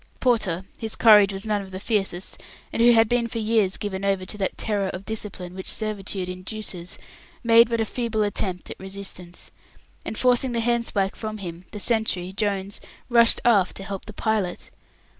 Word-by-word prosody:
Porter, 195 -8 +1
whose 220 -1 -4
courage 210 -3 +7
was 195 +2 -5
none 210 -2 0
of 195 - -9
the 185 0 -6
fiercest, 195 -4 -2 0.3
and - - 0
who 240 +1 +7
had 225 -1 +5
been 240 +1 +1
for 230 - -6
years 215 -3 +2
given 200 -2 -4
over 195 -2 0
to 195 - -5
that 195 - -1
terror 205 -3 -1
of 185 +1 -6
discipline 200 -5 -5
which 190 0 -6
servitude 200 -3 -3
induces, 185 -1 -5 0.5
made 230 0 +6
but 230 -1 0
a 225 - +2
feeble 230 -1 -1
attempt 190 -3 -2
at - - -8
resistance, 190 -2 -9 0.5
and 220 - -5
forcing 250 0 +2
the 235 - 0
handspike 230 -4 0
from 215 -1 -5
him, 175 -2 -7
the 210 - -6
sentry, 200 -5 0
Jones, 200 -1 -2 0.3
rushed 235 -1 +5
aft 205 -6 +4
to 195 - -6
help 195 -1 -6
the 215 - -8
pilot. 210 -5 -2
205 Hz, 180 wpm, -24 LUFS, 190-225 Hz, 0.5 s, courage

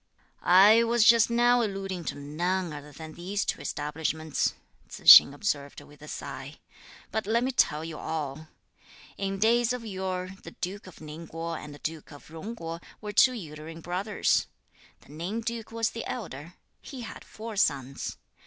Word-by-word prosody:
"I 205 +6 +7
was 235 0 +3
just 230 -1 +6
now 240 +1 +4
alluding 195 -4 -3
to - - -3
none 170 +5 -2
other 150 0 -9
than 155 +2 -10
these 195 +5 -3
two - - -2
establishments," 155 +1 -2 0.3
Tzu - - -10
hsing - - +11
observed 145 -3 -3
with 145 0 -17
a 150 - -11
sigh; - - -7 0.6
"but 220 -2 -2
let 230 +2 +2
me 260 - 0
tell 155 - +2
you 165 -2 -7
all. 155 -1 -4 0.7
In 195 0 -2
days 235 +3 +3
of 245 -2 -5
yore, 185 -2 -3
the - - -11
duke 190 +2 -5
of 180 - -13
Ning 155 +2 -9
Kuo 165 +1 -5
and 150 - -8
the 145 - -15
duke 160 -1 -5
of 145 +1 -14
Jung 195 +9 -7
Kuo 165 -4 -6 0.2
were 210 -1 -6
two 255 - +6
uterine 160 -5 -8
brothers. 190 +5 0 0.5
The - - -21
Ning 175 +9 -4
duke 230 -1 -5
was 225 0 0
the 230 - -5
elder; 170 - -6 0.3
he 265 -4 -9
had 225 - -8
four 220 0 -8
sons. 135 -8 -1
180 Hz, 170 wpm, -28 LUFS, 155-220 Hz, 0.7 s, hsing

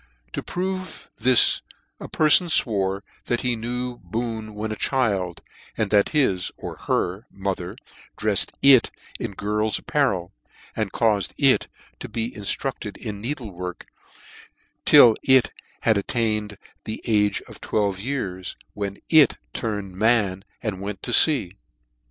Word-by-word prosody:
To - - -3
prove 185 -1 -5
this 125 -2 +4 0.4
a - - -8
pcrfon 155 +3 +5
fwore 100 -9 +1 0.2
that 120 - -1
he 125 -2 0
knew 125 +2 -4
Boone 110 +2 -5
when 110 +1 -4
a - - -2
child, 100 -10 -1 0.3
that 105 -1 +2
his 100 - +1
(or - - -7
her) 95 +6 -1
mother 95 -2 -4 0.4
dreffed 105 -2 +1
it 135 -3 +7 0.3
in - - -4
girls 105 +2 -1
apparel, 100 -12 -1 0.4
and 110 -3 -2
caufed 105 -5 0
it 135 -3 +4 0.3
to - - -7
be 115 +1 -3
inltructed 105 +1 -4
in 105 -3 -6
needle 120 -3 -4
work, 90 0 -7 1.0
till 115 -3 +8
it 130 -2 +4 0.3
had 110 -3 +3
attained 105 -1 -1 0.3
the 110 - -6
age 105 -3 +1
of - - -14
twelve 100 -3 -1
years, 95 -7 -4 0.2
when 100 -1 -4
it 155 -5 +5 0.2
'turned 105 -4 -4
man 100 -3 +1 0.2
3 - - -4
and 95 -3 -3
went 100 -1 -6
to - - -3
Jea. 125 - +5
110 Hz, 135 wpm, -23 LUFS, 100-125 Hz, 1.0 s, till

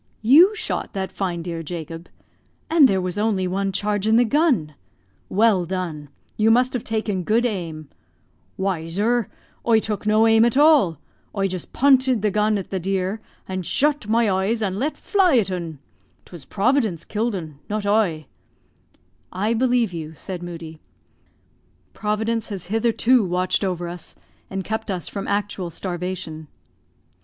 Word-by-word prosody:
"You 330 - +7
shot - - -3
that 190 -1 -3
fine 175 -4 -3
deer, 170 -1 -4
Jacob? 165 0 -7 0.6
and 320 -4 +7
there 195 -4 +1
was 185 +2 -3
only 205 -4 +1
one 195 +2 -1
charge 205 +1 -1
in 220 - +4
the 240 +1 +5
gun! 250 - +1 0.6
Well 205 -2 +3
done; 170 -5 -4 0.3
you 220 +1 +3
must 250 +3 +3
have 250 - -2
taken 215 -4 -2
good 225 +6 +2
aim." 165 -9 -4 0.7
"Why, 190 -4 -2
zur, 215 +6 0 0.4
oie 230 -1 +4
took 215 -1 -4
no 215 +1 +4
aim 225 0 +5
at 240 +2 +2
all. 285 - +5 0.4
Oie 195 0 +2
just 185 -2 -6
pointed 260 -4 +3
the 210 - +2
gun 210 +1 +2
at 195 - -6
the 190 - -1
deer, 190 +3 -2 0.3
and 185 -1 -3
zhut 290 - +1
my 230 +2 +3
oeys 205 +3 0
an 195 0 -3
let 295 +5 -2
fly 370 -9 +3
at 195 -4 +1
'un. 170 -4 -4 0.5
'Twas 170 -7 -11
Providence 215 - 0
kill'd 220 +1 -1
'un, 155 -6 -7
not 210 0 -2
oie." 200 -7 +1 1.1
"I 210 +5 0
believe 240 -4 +1
you," 160 -1 -6
said 180 +2 -6
Moodie; 165 -2 -8 1.1
"Providence 220 +2 -1
has 195 -4 -6
hitherto 230 +2 +3
watched 185 +2 0
over 180 -2 -2
us 175 -1 -8 0.3
and 195 0 -4
kept 220 +3 -4
us 180 -4 -3
from 200 -1 -5
actual 200 -3 -2
starvation." 175 -2 -5
200 Hz, 155 wpm, -22 LUFS, 180-225 Hz, 1.1 s, You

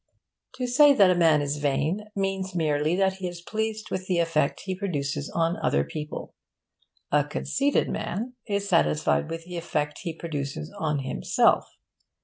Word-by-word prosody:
To 255 - -2
say 280 +4 +6
that 195 -5 +6
a - - +3
man 160 -4 +4
is 145 +1 -2
vain 150 +8 0
means 195 -1 -2
merely 155 0 +1
that 190 0 +1
he 185 -1 -3
is 175 -1 -7
pleased 220 +4 -3
with 185 0 -3
the 180 - +1
effect 165 -4 +1
he 190 - -3
produces 145 -7 -3
on 165 +1 0
other 70 - +1
people. 150 - -6 0.8
A 150 0 +4
conceited 275 - 0
man 230 +8 -3
is 200 -1 -1
satisfied 75 - +2
with 165 0 -5
the 180 0 -6
effect 150 -3 -2
he 165 -2 -5
produces 140 - -4
on 150 -3 0
himself. 60 - +2
170 Hz, 160 wpm, -26 LUFS, 145-195 Hz, 0.8 s, say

